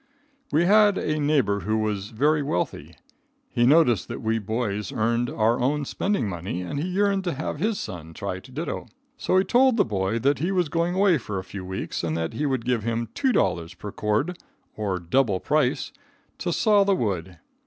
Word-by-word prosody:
We 160 +4 +3
had 205 +1 +5
a 155 0 -1
neighbor 145 -9 +2
who 110 +4 -1
was 105 -2 -2
very 145 +7 +2
wealthy. 90 -11 -3 0.6
He 120 0 +3
noticed 140 - +4
that - - -6
we 110 0 +1
boys 105 -1 -2
earned 115 +2 0
our 115 +2 +1
own 145 +3 0
spending 195 - -1
money, 90 -1 -4
and 115 +10 -4
he 165 - -2
yearned 195 +1 +1
to 175 - -1
have 150 - -4
his 215 0 0
son 80 - -7
try 95 -2 -4
to 130 - -15
ditto. 155 +6 -4 0.3
So 185 - +2
he 190 - +5
told 255 +2 +4
the - - +4
boy 100 0 -1
that 140 +5 +1
he 170 +6 0
was 180 -5 +1
going 170 +3 0
away 190 -5 +4
for 105 -4 -5
a 95 - -3
few 95 0 -8
weeks 95 -1 -4
and 80 -1 -1
that 80 0 -2
he 150 - -1
would 130 -4 -1
give 125 -2 +1
him 115 +1 -2
$2 90 - 0
per 105 - -7
cord, 110 - -1 0.4
or 100 -4 -1
double 95 +3 +1
price, 145 0 0 0.5
to - - -1
saw 210 -3 +4
the 195 0 +2
wood. 95 - -2
120 Hz, 195 wpm, -25 LUFS, 100-165 Hz, 0.6 s, had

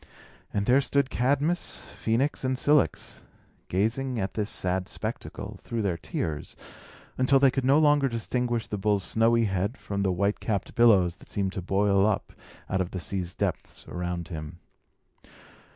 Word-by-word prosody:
And 100 -1 -1
there 130 +5 +5
stood 140 -1 +1
Cadmus, 140 - 0 0.2
Phœnix, 125 +7 +1
and 130 0 0
Cilix, 145 - +1 0.5
gazing 115 +6 0
at 95 -1 -2
this 105 -1 -2
sad 90 0 -1
spectacle, - - -6
through 115 -2 -3
their 95 -4 0
tears, 80 -2 -4 0.6
until 130 +2 +5
they 135 -1 +5
could 135 - -1
no 135 +2 +5
longer 145 -3 +4
distinguish 120 0 -1
the 105 - -4
bull's 100 -1 +1
snowy 115 +2 +3
head 100 +4 -1
from 100 -1 -4
the 95 -1 +2
white 100 +3 0
capped 105 -4 -2
billows 95 -7 +4
that - - -17
seemed 95 -2 -1
to 95 - -3
boil 100 +2 +3
up 110 - -1 0.3
out 95 0 0
of 90 - -2
the 95 - -5
sea's 90 0 -3
depths - - -3
around 90 -1 -4
him. 80 -1 -6
105 Hz, 160 wpm, -27 LUFS, 95-130 Hz, 0.6 s, there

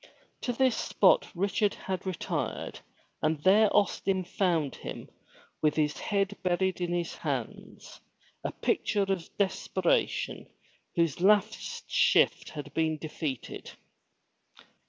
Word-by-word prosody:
To 245 - -1
this 255 0 +2
spot - - +3
Richard 200 +3 +1
had 190 0 -4
re 185 - -1
tired - - -3 0.4
and 155 +1 +1
there 205 +3 +6
Austin 195 -2 +1
found 170 -5 0
him - - -7 0.5
with 150 -1 +2
his 150 -1 0
head 200 -1 0
buried 185 0 0
in 175 -1 -1
his 175 -1 -1
hands, - - -5 0.4
a - - -2
picture 210 - 0
of 195 -3 -2
desperation 205 - 0 0.5
whose 170 -2 +1
last 210 +2 +2
shift - - +3
has 145 -2 -6
been 160 -1 +1
defeated. 150 -4 -5
185 Hz, 115 wpm, -29 LUFS, 165-205 Hz, 0.5 s, there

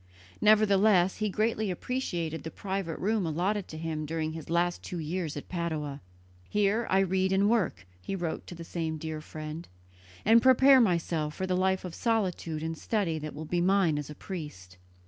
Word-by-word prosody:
Nevertheless 205 -3 +4
he 215 0 0
greatly 215 +1 0
appreciated 175 -6 -3
the 160 - -6
private 190 -3 -4
room 215 +1 0
allotted 185 +6 -1
to 155 - -8
him 155 -1 -3
during 160 0 -2
his 160 -2 -8
last 175 +1 +1
two 180 - -6
years 160 -1 -3
at 145 - -7
Padua. 155 -5 -3 0.5
"Here 210 +3 +1
I 190 +1 +4
read 190 0 +1
and 195 +1 +3
work," 185 - 0 0.2
he 145 - -4
wrote 170 -4 -4
to 175 - -8
the 170 - -8
same 165 -1 -3
dear 155 0 -5
friend, 155 +2 -7 0.6
"and 230 +2 +7
prepare 260 +1 +7
myself 165 -6 0
for 190 - -2
the 185 -1 0
life 190 0 +1
of 180 - -6
solitude 185 -9 -1
and 165 0 -2
study 170 -3 -1
that 155 -1 -6
will 155 +2 -6
be 175 +3 0
mine 180 -5 +3
as 150 - -6
a 150 - -8
priest." 140 - -8
175 Hz, 185 wpm, -29 LUFS, 160-200 Hz, 0.6 s, and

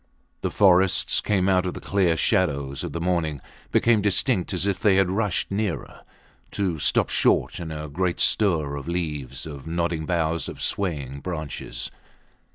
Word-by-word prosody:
The - - -1
forests 95 -2 +4
came 95 -3 +1
out 95 -1 +2
of 90 - -4
the - - -6
clear 90 -5 +1
shadows 70 - 0
of - - -4
the 85 - -4
morning, 85 -4 -1 0.3
became 115 -3 +3
distinct, 100 0 +2
as 90 0 0
if 100 -2 0
they 105 -3 +4
had 95 -1 +3
rushed 100 -3 -1
nearer 100 -3 -3 0.5
to 90 -6 -1
stop - - +2
short - - +2
in 85 -2 -5
a 75 0 -5
great 90 +4 -1
stir 80 -9 +2
of 70 - -8
leaves, 75 -6 -4
of 70 -3 -9
nodding 85 -1 -2
boughs, 85 -2 0
of - - -9
swaying 70 -8 -2
branches. 80 -2 -5
85 Hz, 165 wpm, -24 LUFS, 80-95 Hz, 0.5 s, forests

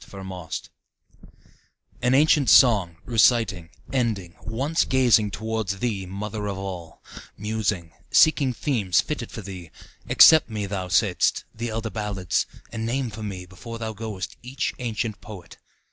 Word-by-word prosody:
Old 95 -1 -8
Chants 90 -3 -6 1.3
An 125 +2 +3
ancient 145 -3 +4
song, 100 - +5
reciting, 115 -7 +2 0.2
ending, 105 -10 -1
Once 135 +8 0
gazing 120 -5 +3
toward 110 +1 -3
thee, 100 -1 -2
Mother 105 +2 -5
of 100 -1 -3
All, 90 -4 -7 0.3
Musing, 105 -5 -2 0.2
seeking 145 -4 +4
themes 110 - 0
fitted 145 -6 -3
for 110 - -7
thee, 90 -4 -8 0.4
Accept 160 -6 +7
me, 105 -2 -3
thou 95 -2 -4
saidst, 90 +1 +2
the 115 +1 -4
elder 110 0 -4
ballads, 100 -5 -1 0.2
And 115 -1 -4
name 120 +1 -1
for 110 +1 -8
me 95 -4 -5
before 115 +6 -9
thou 110 -1 -4
goest 105 -5 -6
each 130 +2 -3
ancient 115 -3 -3
poet. 95 -6 -11
110 Hz, 140 wpm, -24 LUFS, 95-120 Hz, 1.3 s, Accept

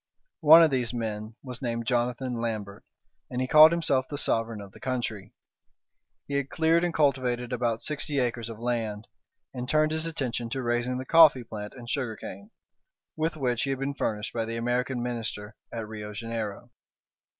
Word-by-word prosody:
One 160 +1 +9
of 160 - +4
these 125 -2 -1
men 110 -1 -4
was 125 -3 -7
named 115 -2 -2
Jonathan 125 +1 0
Lambert, 105 -3 -4 0.5
and 125 - -3
he 130 - +1
called 155 +3 +9
himself 140 -6 +1
the 145 - -4
sovereign 115 -4 0
of 100 -1 -10
the - - -15
country. 120 -6 -4 0.9
He 140 - -5
had 140 -1 0
cleared 165 +1 +2
and 175 - +1
cultivated 130 -5 +1
about 120 -2 -1
sixty 150 -1 -2
acres 120 -3 -1
of 115 - -7
land, 115 -3 -2 0.5
and 125 0 -5
turned 155 0 +3
his 160 +1 +1
attention 125 -7 -3
to 130 +2 -3
raising 120 +1 0
the 130 - -5
coffee 155 -6 +7
plant 105 -2 -7
and 120 -2 -10
sugar 120 -3 -2
cane, 200 - -9 0.7
with 160 0 -1
which 125 -4 0
he 140 - -1
had 135 - 0
been 135 +2 -2
furnished 105 -5 -3
by 115 -1 -1
the 115 +1 -4
American 125 +1 -1
Minister 110 -4 -4 0.2
at 115 -2 -5
Rio 105 -1 -7
Janeiro. 115 +1 -5
125 Hz, 180 wpm, -27 LUFS, 115-140 Hz, 0.9 s, One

